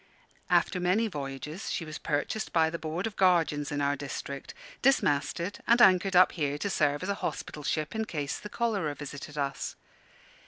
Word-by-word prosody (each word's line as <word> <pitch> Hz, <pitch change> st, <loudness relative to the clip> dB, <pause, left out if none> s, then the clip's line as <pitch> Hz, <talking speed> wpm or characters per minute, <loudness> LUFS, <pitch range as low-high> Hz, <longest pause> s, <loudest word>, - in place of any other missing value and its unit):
After 185 Hz, -, +3 dB
many 185 Hz, +6 st, +2 dB
voyages 150 Hz, +2 st, -5 dB
she 165 Hz, -, -2 dB
was 155 Hz, 0 st, -7 dB
purchased 150 Hz, +9 st, -2 dB
by 160 Hz, -1 st, +3 dB
the 170 Hz, -, -4 dB
Board 160 Hz, +4 st, -3 dB
of 225 Hz, -, -4 dB
Guardians 165 Hz, -6 st, +2 dB
in 145 Hz, 0 st, -1 dB
our 140 Hz, 0 st, +2 dB
district, 140 Hz, 0 st, -6 dB, 0.3 s
dismasted, 170 Hz, -, +1 dB
and 235 Hz, +1 st, +5 dB
anchored 190 Hz, -3 st, +5 dB
up 180 Hz, -, +7 dB
here 145 Hz, -4 st, -1 dB
to 200 Hz, +7 st, -2 dB
serve 145 Hz, -3 st, +1 dB
as 185 Hz, -, -3 dB
a -, -, +2 dB
hospital 150 Hz, -, -4 dB
ship 155 Hz, +1 st, -1 dB
in 220 Hz, 0 st, -1 dB
case 145 Hz, -7 st, -3 dB
the 210 Hz, -, -8 dB
cholera 200 Hz, -11 st, -1 dB
visited 145 Hz, +1 st, -8 dB
us. 140 Hz, -1 st, -2 dB
160 Hz, 180 wpm, -29 LUFS, 145-190 Hz, 0.3 s, up